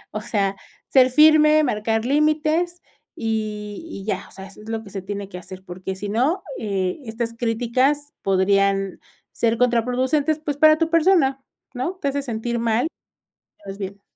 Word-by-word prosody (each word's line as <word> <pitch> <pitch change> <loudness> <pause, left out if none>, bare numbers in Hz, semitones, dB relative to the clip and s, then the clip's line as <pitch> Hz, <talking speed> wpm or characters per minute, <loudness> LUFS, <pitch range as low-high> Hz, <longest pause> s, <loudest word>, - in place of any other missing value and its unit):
O 215 - -2
sea, 200 -3 -1 0.3
ser 260 -1 +5
firme, 305 +1 +6
marcar 225 -3 0
límites, 310 +5 +1 0.3
y 215 +1 -3
y 195 -11 -8
ya, 215 - -3
o - - -20
sea, 190 0 -10
eso 200 +2 -14
es 220 - -11
lo 225 0 -3
que 200 - -12
se 195 - -5
tiene 200 0 -5
que 180 - -8
hacer, 185 +1 -10
porque 190 +1 -6
si 205 +1 -5
no, 275 - +1
eh, 195 0 -2
estas 230 +1 -4
críticas 250 +5 0
podrían, 195 0 +2 0.3
ser 230 -1 0
contraproducentes, 255 +5 +1
pues, 290 -2 -4
para 310 0 +6
tu 325 0 0
persona, 325 -6 +3 0.3
¿no? 260 +10 -3
Te 280 - +1
hace 285 +1 -2
sentir 235 -1 -3
mal. 230 +5 +1 0.8
Te - - -9
ves 195 - -7
bien. 200 0 -7
230 Hz, 170 wpm, -22 LUFS, 200-290 Hz, 0.8 s, firme